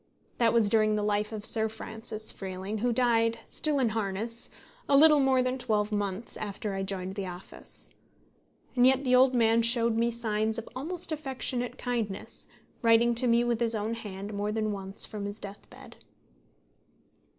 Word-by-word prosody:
That 230 -2 +4
was 230 -2 +3
during 215 0 +3
the 210 - -1
life 210 +1 0
of 215 -1 -4
Sir 220 -1 +3
Francis 220 0 -3
Freeling, 190 +2 -5
who 245 +3 +1
died, 230 -2 +2
still 300 -2 -1
in 255 -4 +2
harness, 220 +2 -3 0.4
a 280 - +6
little 305 0 +7
more 265 -2 +3
than 255 +1 -2
twelve 215 -3 0
months 205 +1 -2
after 205 0 -4
I 195 - -2
joined 190 -1 -3
the 195 -1 -4
office. 180 +1 -8 0.8
And 250 0 +6
yet 265 +1 +3
the 255 -1 +3
old 255 0 +5
man 230 -1 +4
showed 230 0 +4
me 235 +1 +2
signs 220 -1 -1
of 230 - -6
almost 335 +6 -4
affectionate 260 -4 -3
kindness, 230 -6 -4 0.3
writing 230 +1 +4
to 245 +2 +1
me 235 0 +4
with 240 -2 0
his 230 -1 +1
own 215 +1 -2
hand 205 -2 -6
more 205 +1 -2
than 215 0 -1
once 195 0 -2
from 210 -2 -6
his 205 +1 -5
death 200 -1 -10
bed. - - -14
225 Hz, 175 wpm, -29 LUFS, 210-245 Hz, 0.8 s, little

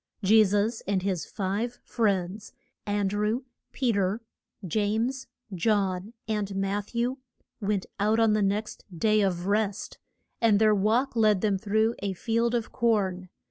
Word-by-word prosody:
] - - -34
Je 215 +3 +6
sus 205 +3 0
and 195 -2 0
his 190 -4 -2
five 210 +5 -2
friends, 200 -2 -1 0.3
An 205 -1 +1
drew, 210 +5 -1 0.3
Pe 255 -3 0
ter, 200 0 0 0.5
James, 220 - -1 0.3
John, 195 +1 0
and 210 -3 -2
Matth 195 +3 -2
ew, 245 +3 0 0.4
went 200 -3 -1
out 215 +2 +2
on 225 -2 +4
the 215 - +2
next 205 +2 -1
Day 215 +4 +3
of 180 -3 0
Rest, 205 0 -1 0.4
and 225 -3 +5
their 215 0 +4
walk 220 +7 +1
led 215 -4 +3
them 205 -3 +1
through 220 +2 +1
a 200 -1 -2
field 230 +5 0
of 230 -2 -2
corn. 195 -6 0
210 Hz, 150 wpm, -27 LUFS, 195-225 Hz, 0.5 s, Je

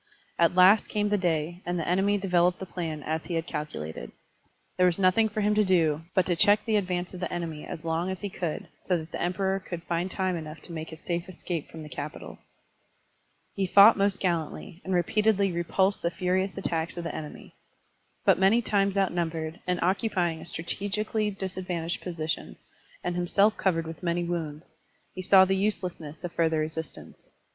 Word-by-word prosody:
At 170 +1 +4
last 185 +4 +6
came 210 -1 0
the 210 - +2
day, 170 0 -1
and 175 0 -2
the 165 - -3
enemy 195 +3 +2
developed 180 -2 +2
the 190 - -6
plan 165 -5 -5
as 160 +1 -2
he 175 - -3
had 165 0 -1
calculated. 80 - -5 0.6
There 180 - +4
was 175 - +1
nothing 195 +4 +4
for 215 +1 -2
him 210 +1 +2
to 210 0 +4
do 165 -5 +2
but 185 - +4
to 175 - +1
check 205 +4 +4
the 220 -2 +1
advance 180 -3 -1
of 180 - -7
the 180 - -3
enemy 165 -3 -4
as 155 - -7
long 165 +2 -1
as 190 -1 -4
he 205 - -2
cotdd, 175 -4 -4 0.2
so 180 - +1
that 160 0 -8
the - - -4
Emperor 190 +2 0
could 175 -3 -7
find 175 +1 -1
time 185 -1 -1
enough 155 -1 -7
to - - -10
make 160 -1 -5
his 160 0 -11
safe 170 +1 -3
escape 170 -3 -5
from 160 -1 -9
the - - -8
capital. 150 0 -7 1.1
He 195 -1 -1
fought 200 +4 +8
most 200 -1 +1
gallantly, 175 +1 -2
and 190 -1 -1
repeatedly 200 +2 +2
repulsed 190 +3 +1
the 170 - +1
furious 185 +2 -1
attacks 170 -3 -2
of 170 - -3
the 170 - -4
enemy. 150 -1 -8 0.7
But - - +5
many 205 +5 +4
times 200 -2 +1
outnumbered, 165 -4 -1
and 180 -1 +1
occupying 180 -4 0
a - - -9
strategically 205 +6 -1
disadvantageous 185 -3 -4
posi 165 -3 -4
tion, - - -3 0.5
and 175 0 -2
himself 195 +4 +3
covered 165 -4 0
with 160 0 -8
many 175 -1 0
wounds, 165 -3 -4 0.4
he 185 - -5
saw 190 +1 +7
the 190 +1 +1
uselessness 180 -6 -2
of 175 - -4
further 165 -1 +1
resistance. 160 +1 -5
180 Hz, 190 wpm, -27 LUFS, 165-195 Hz, 1.1 s, fought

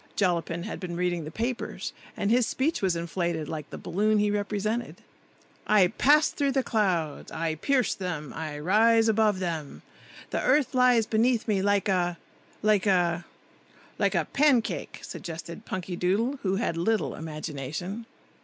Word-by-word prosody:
(Jollapin 170 -3 0
had 215 - -5
been 175 -3 -5
reading 175 -2 -1
the - - -5
papers, 235 +8 -3 0.2
and 200 - 0
his 240 0 +4
speech 300 +5 0
was 190 -3 +1
inflated, 170 -2 -2
like 155 -2 -5
the - - -7
balloon 215 +3 +1
he 205 0 +2
represented.) 210 +3 -2 0.6
"I 200 -4 +5
pass 295 +7 +4
through 280 -2 0
the 265 -1 +2
clouds; 180 -10 -1
I 165 -1 -1
pierce 255 - +1
them; 170 -6 -5
I 155 -2 -5
rise 225 +8 +4
above 215 -2 +3
them. 165 -6 -4 0.5
The - - 0
earth 290 -4 +2
lies 250 -3 +4
beneath 230 +2 +1
me 205 -3 +1
like 205 +1 +2
a—like 190 +3 -1
a—" 175 -3 +2 0.7
"Like - - +2
a - - +2
pancake!" 275 -5 +1
suggested 170 -1 -7
Punkydoodle, 190 +8 -1
who 190 -1 0
had 195 -5 -1
little 210 +2 0
imagination. 160 - -5
195 Hz, 145 wpm, -27 LUFS, 170-225 Hz, 0.7 s, I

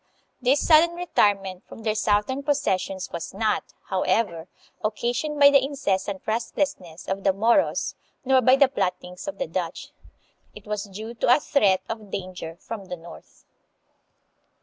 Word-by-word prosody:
This 260 +3 +2
sudden 335 +1 +6
retirement 200 - +1
from 225 - -11
their 215 -1 +1
southern 210 +5 +1
possessions 195 -10 -1
was 170 +2 -6
not, 215 0 0 0.2
how 190 -1 0
ever, 185 -4 0 0.4
occasioned 240 +7 -1
by 285 0 +8
the 275 -2 +5
incessant 200 -9 -2
restlessness 220 - -3
of 195 +1 -3
the 195 - +4
Moros 230 +8 +2 0.3
nor 260 0 +4
by 255 +2 +6
the 275 0 +5
plottings 180 -3 -3
of 295 - -4
the - - -2
Dutch. - - -4 0.6
It 210 - -12
was 210 -1 -3
due 215 +4 -8
to 245 +1 +4
a - - 0
threat 205 -11 +2
of 220 -2 -6
danger 180 -4 -6
from 205 +2 -8
the 180 -1 -6
north. 170 +1 -14
215 Hz, 150 wpm, -25 LUFS, 190-265 Hz, 0.6 s, by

